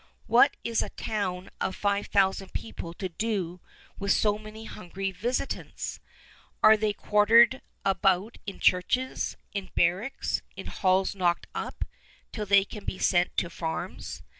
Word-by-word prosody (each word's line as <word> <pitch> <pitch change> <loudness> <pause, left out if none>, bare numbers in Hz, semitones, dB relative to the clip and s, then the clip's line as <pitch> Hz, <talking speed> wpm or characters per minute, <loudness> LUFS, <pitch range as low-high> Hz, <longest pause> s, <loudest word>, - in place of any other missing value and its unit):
What - - +5
is 230 -1 +1
a - - -3
town 185 -4 -3
of 190 - -1
five 200 0 0
thousand 195 -1 +1
people 170 -6 -6
to 190 - -3
do 185 -2 -2 0.4
with 200 0 0
so 210 +1 +3
many 215 +1 -10
hungry 195 -2 -5
visitants? 235 +9 -3 0.6
They 215 0 +6
are - - 0
quartered 225 +5 +5 0.2
about 195 +2 +2
in 195 - -6
churches, 250 +8 +1 0.2
in 195 -3 -4
barracks, 190 +11 +1
in - - -8
halls 190 -1 +1
knocked 175 -3 +1
up, - - -4 0.5
till 210 -2 -4
they 195 0 +6
can 210 0 -9
be - - -4
sent 175 -1 +2
to 170 - +1
farms. 160 -1 -5
200 Hz, 140 wpm, -28 LUFS, 185-215 Hz, 0.6 s, They